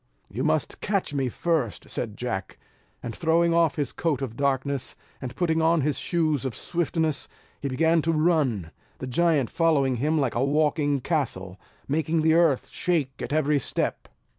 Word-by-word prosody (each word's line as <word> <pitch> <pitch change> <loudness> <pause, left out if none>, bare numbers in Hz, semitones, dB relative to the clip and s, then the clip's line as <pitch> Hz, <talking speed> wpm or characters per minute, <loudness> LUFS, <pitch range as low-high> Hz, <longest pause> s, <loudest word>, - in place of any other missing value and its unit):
"You 120 +7 -3
must 155 -1 0
catch 200 -7 -1
me 135 -3 0
first," 155 -5 -1
said 110 -4 -4
Jack; 120 -6 -4 0.5
and 115 -2 -5
throwing 170 +1 +2
off 165 -2 +3
his 145 -5 -2
coat 150 -5 -1
of 115 -4 -5
darkness, 140 0 -1 0.3
and 130 -1 -6
putting 165 -3 +1
on 165 0 +3
his 145 0 0
shoes 155 -5 0
of 130 -4 -3
swiftness, 160 -3 -1 0.3
he 140 - -2
began 160 +5 +3
to 165 - +1
run; 155 - +1 0.3
the - - -6
giant 145 -1 +1
following 145 -7 +2
him 155 +5 +1
like 135 -4 0
a 120 - +1
walking 145 -1 +1
castle, 105 - -2 0.3
making 155 +2 0
the 160 0 +4
earth 165 -5 +3
shake 165 -7 0
at - - -4
every 150 -1 +2
step. - - -2
150 Hz, 165 wpm, -26 LUFS, 130-165 Hz, 0.5 s, the